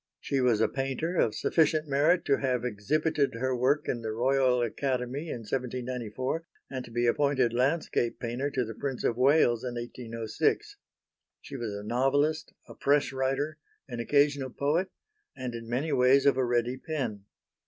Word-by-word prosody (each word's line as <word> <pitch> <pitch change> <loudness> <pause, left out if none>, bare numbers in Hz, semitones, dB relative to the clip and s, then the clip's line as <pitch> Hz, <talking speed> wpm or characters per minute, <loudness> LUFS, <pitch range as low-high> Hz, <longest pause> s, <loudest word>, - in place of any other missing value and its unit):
She 135 -1 -1
was 120 -4 +3
a - - +4
painter 135 +6 -2
of 110 - +2
sufficient 155 -1 +2
merit 150 +5 +3
to 140 - +3
have 125 -3 0
exhibited 135 +5 0
her 130 +2 -1
work 130 +4 +1
in 120 - -1
the 110 -1 -3
Royal 125 +1 +2
Academy 130 +5 -2
in 120 - -4
1794 125 +3 -3 0.3
and 130 -2 -4
to - - -12
be 120 +1 0
appointed 130 -1 +2
landscape 130 -1 0
painter 120 +4 -2
to 130 -3 -1
the 115 - -6
Prince 135 +2 -4
of 115 - +1
Wales 125 -2 +4
in 125 -1 -4
1806. 115 -2 -2 0.6
She - - -10
was 120 -5 -4
a 100 - -6
novelist, 140 +7 +1 0.2
a - - -10
press 140 0 +1
writer, 135 +3 -1 0.3
an 120 -3 -6
occasional 140 +2 +2
poet 150 +9 0 0.5
and 130 -2 -4
in 115 -1 -7
many 135 +6 -1
ways 130 +2 +4
of 140 - +5
a 130 - +1
ready 120 +1 0
pen. 125 -10 -4
130 Hz, 165 wpm, -29 LUFS, 120-140 Hz, 0.6 s, of